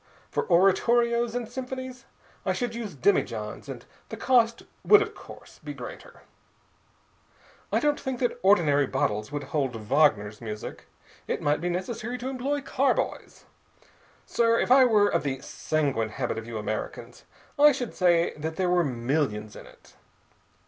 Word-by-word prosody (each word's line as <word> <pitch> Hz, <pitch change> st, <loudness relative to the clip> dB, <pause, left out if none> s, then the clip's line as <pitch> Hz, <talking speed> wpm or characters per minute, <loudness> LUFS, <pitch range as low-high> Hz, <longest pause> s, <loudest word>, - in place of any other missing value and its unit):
For -, -, -1 dB
oratorios 235 Hz, +6 st, +3 dB
and 245 Hz, -2 st, -2 dB
symphonies 260 Hz, 0 st, -7 dB, 0.4 s
I -, -, 0 dB
should 245 Hz, -2 st, -3 dB
use 225 Hz, -7 st, -6 dB
demijohns, 115 Hz, -, -1 dB
and -, -, -8 dB, 0.2 s
the -, -, -6 dB
cost 235 Hz, -2 st, +2 dB, 0.2 s
would 415 Hz, -, +7 dB
of 425 Hz, -, -3 dB
course -, -, -14 dB
be -, -, -6 dB
greater. -, -, -10 dB, 1.5 s
I -, -, +2 dB
don't 295 Hz, 0 st, +1 dB
think 265 Hz, -2 st, -4 dB
that 245 Hz, -, -1 dB
ordinary 155 Hz, -8 st, +4 dB
bottles 105 Hz, +1 st, -1 dB
would 145 Hz, -1 st, -4 dB
hold 135 Hz, -3 st, -2 dB
Wagner's 110 Hz, -3 st, +1 dB
music. 105 Hz, -2 st, -7 dB, 0.4 s
It -, -, -1 dB
might 145 Hz, +1 st, +1 dB
be 175 Hz, -, -1 dB
necessary 220 Hz, +7 st, -3 dB
to 250 Hz, +2 st, -4 dB
employ 270 Hz, +2 st, -2 dB
carboys. 275 Hz, 0 st, -1 dB, 0.8 s
Sir, 230 Hz, -1 st, +2 dB
if -, -, 0 dB
I 260 Hz, 0 st, +8 dB
were 210 Hz, -4 st, +4 dB
of -, -, +1 dB
the 135 Hz, -2 st, -3 dB
sanguine 140 Hz, -8 st, -1 dB
habit 120 Hz, 0 st, -3 dB
of 110 Hz, -, -10 dB
you 115 Hz, -1 st, -5 dB
Americans, 110 Hz, 0 st, -5 dB, 0.3 s
I 295 Hz, +1 st, +8 dB
should 250 Hz, -4 st, -4 dB
say 175 Hz, -2 st, +2 dB
that 160 Hz, +1 st, -4 dB
there 180 Hz, 0 st, 0 dB
were 180 Hz, -1 st, +3 dB
millions 120 Hz, -5 st, -2 dB
in -, -, -11 dB
it. -, -, -20 dB
180 Hz, 155 wpm, -26 LUFS, -, 1.5 s, I